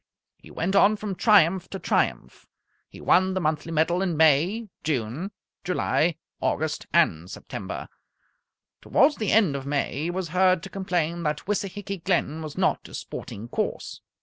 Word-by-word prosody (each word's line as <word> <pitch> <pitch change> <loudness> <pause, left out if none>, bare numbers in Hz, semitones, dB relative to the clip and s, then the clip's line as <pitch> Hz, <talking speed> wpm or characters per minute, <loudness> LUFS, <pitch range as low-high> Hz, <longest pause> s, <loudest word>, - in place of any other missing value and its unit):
He - - -17
went 190 +4 -2
on 205 +2 +5
from 210 -1 -4
triumph 190 -3 +4
to 195 - -5
triumph. - - -1 0.4
He - - -13
won 190 +1 +3
the - - +1
monthly 155 -1 -1
medal 165 +3 +1
in 180 -5 -1
May, 160 +9 +3 0.2
June, 145 - -2 0.3
July, 175 -3 +1 0.2
August, 155 +1 -1
and 90 - +2
September. - - -7 0.9
Towards 290 +2 +3
the 215 - -1
end 195 -9 +4
of 135 0 -5
May 140 +1 -1
he - - -1
was 180 -1 -3
heard 185 0 +3
to 195 - -8
complain 175 -4 -1
that 150 -2 -2
Wissahicky 200 -2 -3
Glen 160 -4 0
was 155 -2 -7
not - - 0
a - - -9
sporting 110 +4 -7
course. - - -3
175 Hz, 155 wpm, -25 LUFS, 155-195 Hz, 0.9 s, on